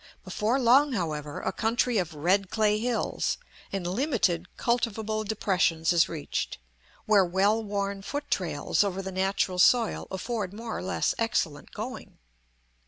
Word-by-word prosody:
Before 230 Hz, +6 st, 0 dB
long, 265 Hz, +3 st, +5 dB
however, 150 Hz, -7 st, -3 dB
a -, -, -1 dB
country 235 Hz, 0 st, +1 dB
of 165 Hz, -4 st, -3 dB
red 185 Hz, +6 st, +1 dB
clay 215 Hz, -1 st, +2 dB
hills 240 Hz, 0 st, -1 dB, 0.3 s
and 195 Hz, -3 st, -3 dB
limited 190 Hz, -, 0 dB
cultivable 220 Hz, -3 st, 0 dB
depressions 185 Hz, -6 st, +1 dB
is 170 Hz, -1 st, +4 dB
reached, 155 Hz, -3 st, -3 dB, 0.5 s
where 210 Hz, -2 st, +5 dB
well 195 Hz, +5 st, +2 dB
worn 200 Hz, -1 st, -2 dB
foot 290 Hz, +8 st, -5 dB
trails 160 Hz, -1 st, +1 dB
over 195 Hz, -1 st, -2 dB
the 190 Hz, -, -5 dB
natural 190 Hz, -1 st, 0 dB
soil 230 Hz, +4 st, +4 dB
afford 200 Hz, 0 st, -3 dB
more 225 Hz, +1 st, -5 dB
or -, -, -4 dB
less 190 Hz, +1 st, 0 dB
excellent 165 Hz, -10 st, -1 dB
going. 245 Hz, +5 st, -7 dB
200 Hz, 140 wpm, -27 LUFS, 180-225 Hz, 0.5 s, long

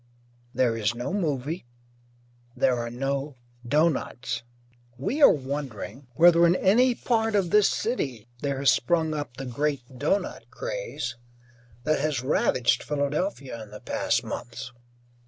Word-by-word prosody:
There 125 Hz, -2 st, +2 dB
is 110 Hz, 0 st, 0 dB
no 120 Hz, +10 st, -3 dB
movie, 155 Hz, -5 st, -2 dB, 0.9 s
there 125 Hz, 0 st, +3 dB
are 120 Hz, 0 st, -3 dB
no 135 Hz, +3 st, -2 dB, 0.3 s
doughnuts. 130 Hz, -4 st, 0 dB, 0.6 s
We 265 Hz, -, -2 dB
are -, -, +10 dB
wondering 135 Hz, -3 st, -3 dB
whether 170 Hz, 0 st, +7 dB
in 170 Hz, -, +4 dB
any 235 Hz, +7 st, +4 dB
part 225 Hz, -3 st, +1 dB
of 185 Hz, -4 st, +1 dB
this 210 Hz, -1 st, +5 dB
city 130 Hz, -, -2 dB
there 140 Hz, 0 st, -2 dB
has 140 Hz, 0 st, +4 dB
sprung 160 Hz, -3 st, +1 dB
up 145 Hz, -5 st, -5 dB
the 135 Hz, -, -5 dB
great 130 Hz, -1 st, -3 dB
doughnut 195 Hz, +8 st, -1 dB
craze -, -, -4 dB, 0.7 s
that 155 Hz, +1 st, +2 dB
has 145 Hz, -3 st, -1 dB
ravaged 130 Hz, -2 st, +2 dB
Philadelphia 140 Hz, -, -2 dB
in 110 Hz, -, -10 dB
the 105 Hz, 0 st, -9 dB
past -, -, 0 dB
months. 120 Hz, +1 st, -6 dB
140 Hz, 135 wpm, -26 LUFS, 125-170 Hz, 0.9 s, are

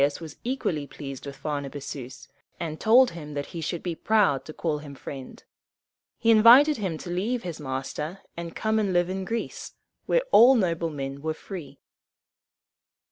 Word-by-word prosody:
Agesilaus 140 Hz, +1 st, +2 dB
was 160 Hz, -3 st, -9 dB
equally 190 Hz, -, -2 dB
pleased 135 Hz, -2 st, -8 dB
with 140 Hz, -, -7 dB
Pharnabazus, 140 Hz, -3 st, -6 dB, 0.3 s
and 160 Hz, -2 st, -4 dB
told 245 Hz, +2 st, +6 dB
him 150 Hz, -3 st, -8 dB
that 145 Hz, 0 st, -2 dB
he 170 Hz, -, -4 dB
should 165 Hz, +2 st, -3 dB
be 175 Hz, -, -2 dB
proud 200 Hz, -6 st, +2 dB
to -, -, -7 dB
call 155 Hz, -2 st, -2 dB
him 145 Hz, -2 st, -10 dB
friend. 135 Hz, -1 st, -9 dB, 0.7 s
He 230 Hz, -, +3 dB
invited 245 Hz, +7 st, +8 dB
him 190 Hz, -7 st, -2 dB
to 175 Hz, -, -7 dB
leave 225 Hz, +7 st, -1 dB
his 170 Hz, -3 st, -5 dB
master, 150 Hz, +6 st, -4 dB
and 170 Hz, -1 st, -7 dB
come 220 Hz, 0 st, +1 dB
and 200 Hz, -3 st, 0 dB
live 175 Hz, +1 st, +2 dB
in 190 Hz, 0 st, -3 dB
Greece, 230 Hz, +3 st, -4 dB, 0.3 s
where -, -, +3 dB
all 250 Hz, +4 st, +8 dB
noble 170 Hz, -6 st, +1 dB
men 140 Hz, -2 st, -5 dB
were 155 Hz, +1 st, -2 dB
free. 155 Hz, -7 st, -9 dB
165 Hz, 170 wpm, -26 LUFS, 145-215 Hz, 0.7 s, invited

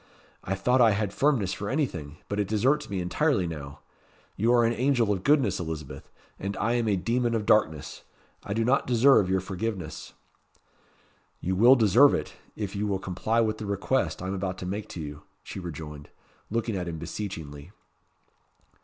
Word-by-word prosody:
"I 95 Hz, -, -2 dB
thought 125 Hz, +7 st, +2 dB
I 115 Hz, -3 st, +6 dB
had 100 Hz, -1 st, -2 dB
firmness 130 Hz, -10 st, +1 dB
for 100 Hz, -, -4 dB
anything; 85 Hz, -, -2 dB
but 100 Hz, -, -3 dB
it 100 Hz, -, 0 dB
deserts 130 Hz, +9 st, +1 dB
me 95 Hz, -2 st, -2 dB
entirely 95 Hz, -, +1 dB
now. 75 Hz, -3 st, -7 dB, 0.5 s
You 115 Hz, +4 st, +2 dB
are 120 Hz, -1 st, +5 dB
an 115 Hz, -, +2 dB
angel 120 Hz, -4 st, +2 dB
of 95 Hz, -2 st, -2 dB
goodness, 135 Hz, -, +3 dB
Elizabeth; 80 Hz, -4 st, -6 dB, 0.3 s
as 100 Hz, +1 st, -3 dB
I 115 Hz, +3 st, +1 dB
am 120 Hz, -2 st, 0 dB
a 105 Hz, -, +2 dB
demon 115 Hz, +5 st, 0 dB
of 110 Hz, -2 st, -1 dB
darkness. 80 Hz, -10 st, +1 dB, 0.4 s
I 100 Hz, -, -4 dB
do 115 Hz, 0 st, +1 dB
not 130 Hz, +3 st, +2 dB
deserve 120 Hz, -5 st, +5 dB
your 95 Hz, 0 st, +1 dB
forgiveness." 95 Hz, +1 st, -5 dB, 1.3 s
"You 95 Hz, +2 st, -1 dB
will 120 Hz, +7 st, +7 dB
deserve 120 Hz, +4 st, +5 dB
it, -, -, -4 dB, 0.2 s
if 100 Hz, -2 st, -4 dB
you 105 Hz, +1 st, -1 dB
will 100 Hz, -2 st, 0 dB
comply 95 Hz, +5 st, -1 dB
with 110 Hz, -1 st, -1 dB
the 105 Hz, -, -5 dB
request 100 Hz, +1 st, -1 dB
I -, -, -3 dB
am 95 Hz, -, -2 dB
about 95 Hz, -1 st, -3 dB
to -, -, -6 dB
make 100 Hz, +3 st, -4 dB
to -, -, -7 dB
you," 75 Hz, -1 st, -7 dB, 0.2 s
she -, -, -7 dB
rejoined, 75 Hz, -4 st, -8 dB, 0.4 s
looking 115 Hz, 0 st, -1 dB
at 90 Hz, -2 st, -3 dB
him 85 Hz, -1 st, -4 dB
beseechingly. 80 Hz, -4 st, -6 dB
100 Hz, 180 wpm, -27 LUFS, 90-115 Hz, 1.3 s, will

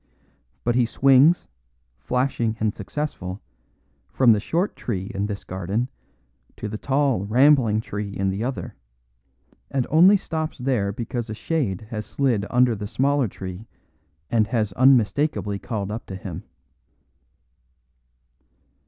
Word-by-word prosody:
But 120 Hz, -, +1 dB
he 120 Hz, -1 st, +2 dB
swings, 135 Hz, +7 st, +4 dB, 0.5 s
flashing 120 Hz, -, -1 dB
and 110 Hz, -1 st, 0 dB
successful, 105 Hz, -6 st, -5 dB, 0.7 s
from 125 Hz, -3 st, +4 dB
the 105 Hz, -, +4 dB
short 170 Hz, -, -1 dB
tree 95 Hz, -5 st, -4 dB
in 100 Hz, +1 st, -1 dB
this 100 Hz, -1 st, -5 dB
garden 95 Hz, +7 st, -2 dB, 0.7 s
to 105 Hz, -, -5 dB
the 105 Hz, +1 st, -5 dB
tall, 135 Hz, -7 st, +1 dB
rambling 120 Hz, -1 st, +4 dB
tree 105 Hz, -2 st, -5 dB
in 95 Hz, 0 st, 0 dB
the 100 Hz, +4 st, -3 dB
other, 130 Hz, +2 st, -4 dB, 1.0 s
and 135 Hz, -3 st, 0 dB
only 180 Hz, +6 st, +7 dB
stops 160 Hz, -3 st, -4 dB
there 125 Hz, -6 st, 0 dB
because 115 Hz, +2 st, -4 dB
a 110 Hz, -, -4 dB
shade 115 Hz, -, -1 dB
has 105 Hz, -2 st, -4 dB
slid 120 Hz, -7 st, 0 dB
under 125 Hz, -1 st, +3 dB
the 105 Hz, 0 st, -5 dB
smaller 135 Hz, +4 st, +1 dB
tree 95 Hz, +2 st, -8 dB, 0.6 s
and 110 Hz, -3 st, +3 dB
has 110 Hz, -5 st, -1 dB
unmistakably 125 Hz, -2 st, +2 dB
called 105 Hz, -3 st, -4 dB
up 110 Hz, +2 st, -6 dB
to 95 Hz, -, -6 dB
him. 95 Hz, -3 st, -7 dB
115 Hz, 130 wpm, -23 LUFS, 100-135 Hz, 1.0 s, only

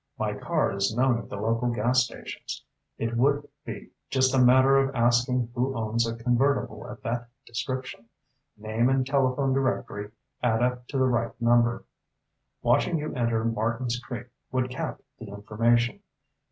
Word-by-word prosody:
My -, -, -1 dB
car -, -, 0 dB
is 100 Hz, +2 st, 0 dB
known 125 Hz, -2 st, +3 dB
at -, -, -10 dB
the -, -, -5 dB
local 115 Hz, +4 st, 0 dB
gas 120 Hz, +2 st, +3 dB
stations. 125 Hz, -, -7 dB, 0.3 s
It 115 Hz, +1 st, -2 dB
would 145 Hz, +3 st, +2 dB, 0.2 s
be -, -, -7 dB, 0.2 s
just 130 Hz, -1 st, +2 dB
a 135 Hz, -, +4 dB
matter 130 Hz, +2 st, +6 dB
of 135 Hz, 0 st, +1 dB
asking 120 Hz, 0 st, +2 dB
who 130 Hz, +2 st, -1 dB
owns 115 Hz, +1 st, 0 dB
a 115 Hz, -, -3 dB
convertible 125 Hz, +4 st, +1 dB
of -, -, -10 dB
that 120 Hz, +1 st, -3 dB, 0.2 s
description. 130 Hz, 0 st, -4 dB, 0.5 s
Name 110 Hz, +3 st, +1 dB
and 135 Hz, -1 st, +2 dB
telephone 135 Hz, 0 st, +1 dB
directory 120 Hz, -6 st, -1 dB, 0.3 s
add 120 Hz, -1 st, +2 dB
up 125 Hz, 0 st, -1 dB
to 140 Hz, -, -3 dB
the 130 Hz, -, +3 dB
right 120 Hz, -2 st, 0 dB
number. 120 Hz, 0 st, +3 dB, 0.8 s
Watching 170 Hz, -, +3 dB
you 150 Hz, 0 st, -4 dB
enter 115 Hz, -3 st, 0 dB
Martins 115 Hz, +2 st, -1 dB
Creek 120 Hz, -1 st, -7 dB, 0.3 s
would 130 Hz, 0 st, 0 dB
cap 130 Hz, -, -4 dB, 0.2 s
the 115 Hz, -, -8 dB
information. 115 Hz, +4 st, +1 dB
120 Hz, 155 wpm, -27 LUFS, 115-130 Hz, 0.8 s, matter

